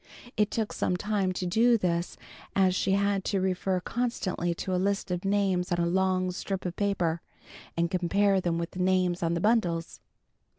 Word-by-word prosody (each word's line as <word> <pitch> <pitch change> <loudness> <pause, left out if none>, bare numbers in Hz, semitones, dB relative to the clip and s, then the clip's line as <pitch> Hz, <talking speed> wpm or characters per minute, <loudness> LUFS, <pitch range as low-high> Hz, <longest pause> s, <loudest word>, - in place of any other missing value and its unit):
It 210 -1 +2
took 220 -2 -2
some 180 - 0
time 200 -1 0
to 185 - -3
do 230 +6 +4
this, 175 -3 -1 0.4
as 190 -2 +4
she 190 +1 +1
had 200 -1 +1
to 195 - 0
refer 185 0 0
constantly 185 -6 -2
to 185 +2 -3
a 180 - +1
list 200 0 -1
of 180 0 -2
names 195 -3 +1
on 175 - +2
a 170 - +1
long 185 +1 +1
strip 190 +1 -4
of 175 -1 -3
paper, 175 -5 0 0.6
and 170 +1 +1
compare 195 +2 +2
them 170 -2 0
with 170 0 -3
the 185 - -8
names 180 -1 +2
on 170 0 +1
the - - 0
bundles. 180 -7 +1
185 Hz, 185 wpm, -28 LUFS, 175-200 Hz, 0.6 s, do